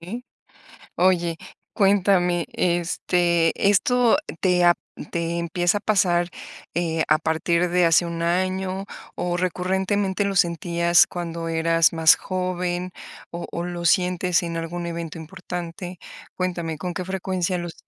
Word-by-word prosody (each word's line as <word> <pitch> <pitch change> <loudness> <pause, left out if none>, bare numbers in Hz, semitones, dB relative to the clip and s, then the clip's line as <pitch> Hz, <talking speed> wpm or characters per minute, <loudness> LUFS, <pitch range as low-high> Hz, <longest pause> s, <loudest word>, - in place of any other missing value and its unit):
Mm, 195 +9 -6 0.8
oye, 175 -2 +2 0.4
cuéntame, 190 -4 +3
este, 175 -1 +1 0.2
¿esto 245 +5 +3 0.2
te 180 -2 +3
ha 175 0 +7 0.4
te 170 0 -2
empieza 175 +3 0
a - - -6
pasar, 175 -5 +2 0.5
eh, 165 -2 0
a 155 +1 +4
partir 170 +2 0
de 180 0 +3
hace 165 +1 +4
1 170 0 -4
año 185 +2 -1 0.3
o 175 0 -2
recurrentemente 190 +2 0
lo 200 -1 -2
sentías 170 0 +3
cuando 170 -1 -5
eras 165 0 +2
más 160 -1 +6
joven, 180 -1 -3 0.4
o 170 0 -6
o 170 - -3
lo 175 -1 -5
sientes 180 0 +2
en 165 -1 -3
algún 170 +1 -4
evento 170 -1 -5
importante? 175 +1 -7 0.4
Cuéntame, 170 -4 -3
¿con 180 +1 -4
qué 180 - -4
frecuencia 185 -1 -2
los? 175 -1 -5
175 Hz, 130 wpm, -23 LUFS, 170-185 Hz, 0.8 s, ha